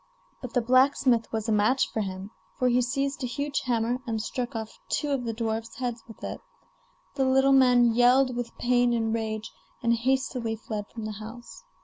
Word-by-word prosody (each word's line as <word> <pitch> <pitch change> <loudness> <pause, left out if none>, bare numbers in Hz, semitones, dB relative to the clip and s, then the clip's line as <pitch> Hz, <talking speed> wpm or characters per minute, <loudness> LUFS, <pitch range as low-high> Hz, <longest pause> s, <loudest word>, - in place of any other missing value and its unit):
But 250 -3 -7
the 245 - +2
blacksmith 255 -1 +3
was 220 0 -2
a - - +1
match 215 +5 +3
for 220 - -1
him, 190 0 -5 0.3
for 255 - +2
he 245 +1 +3
seized 275 +4 -1
a - - 0
huge 280 +4 -2
hammer 240 0 0
and 225 -1 -1
struck 240 +2 -4
off 220 -1 -6
two 295 - -1
of 265 -3 -1
the 230 - -1
dwarf's 225 0 -3
heads 245 -3 -3
with 225 - -14
it. - - -5 0.7
The 270 - 0
little 265 +1 +4
man 245 -3 +5
yelled 250 +2 +4
with 240 -1 -5
pain 245 0 +2
and 225 -1 0
rage, 220 -1 -3 0.3
and 235 0 +3
hastily 245 -1 0
fled 215 -2 -5
from 225 -2 -8
the 215 -1 -6
house. 235 - -10
240 Hz, 195 wpm, -27 LUFS, 225-255 Hz, 0.7 s, man